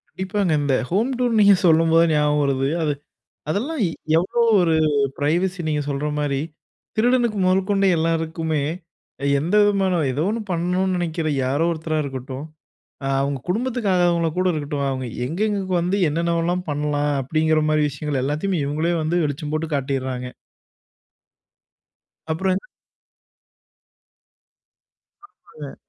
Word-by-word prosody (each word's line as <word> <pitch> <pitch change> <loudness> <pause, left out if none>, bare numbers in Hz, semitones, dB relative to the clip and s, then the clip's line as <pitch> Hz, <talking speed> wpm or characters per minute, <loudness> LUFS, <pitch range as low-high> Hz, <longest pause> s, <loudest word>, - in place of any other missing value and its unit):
கண்டிப்பாங்க, 190 -2 -1
இந்த 140 -2 +1 0.2
ஹோம் 215 +8 +1
டூர்ன்னு 240 -3 +1
நீங்க 200 0 +7
சொல்லும்போது 165 0 +5
ஞாபகம் 150 0 +2
வருது, 135 -1 +1 0.2
அது 150 -2 +1 0.6
அதெல்லாம் 265 - -2
இ - - 0 0.3
எவ்ளோ 185 +7 -1 0.2
ஒரு 165 -2 +2 0.4
பிரைவசி 175 +6 0
நீங்க 150 -1 0
சொல்ற 140 +1 -2
மாரி. 145 -2 0 0.6
திருடனுக்கு 240 -1 +2
மொதல் 190 +1 +2
கொண்ட 200 -1 +2
எல்லாருக்குமே, 160 -1 -1 0.8
எந்த 165 +6 -3
விதமான 195 -3 +2
ஏதோ 145 +4 -1
ஒண்ணு 230 +2 -2
பண்ணணும்னு 180 +2 0
நினைக்கிற 165 -2 -2 0.2
யாரோ 140 +5 +1
ஒருத்தரா 160 -1 -2
இருக்கட்டும், 135 0 -6 0.6
அ, - - -2
அவங்க 140 0 -1
குடும்பத்துக்கு 235 +2 -1
ஆகாதவங்கள 175 -2 +2
கூட 185 0 +2
இருக்கட்டும், 145 -2 -3
அவங்க 130 -1 -3 0.2
எங்கெங்க 205 +7 -1 0.2
வந்து, 180 +4 0
என்னென்னவெல்லாம் 170 +3 0
பண்ணலாம், 145 0 0
அப்டிங்கிற 155 +3 +1
மாரி 155 0 +2
விஷயங்கள் 145 -1 -3
எல்லாத்தையுமே 150 +4 -1
இவங்களே 155 +4 0
வந்து 165 +3 0
வெளிச்சம் 145 +1 -4
போட்டு 155 +1 -2
காட்டிறாங்க. 130 -2 -3 2.0
அப்பறம் 185 +4 0
என்ன? 195 - -5 2.6
ஆமாங்க. 150 - -12
165 Hz, 125 wpm, -22 LUFS, 145-185 Hz, 2.6 s, நீங்க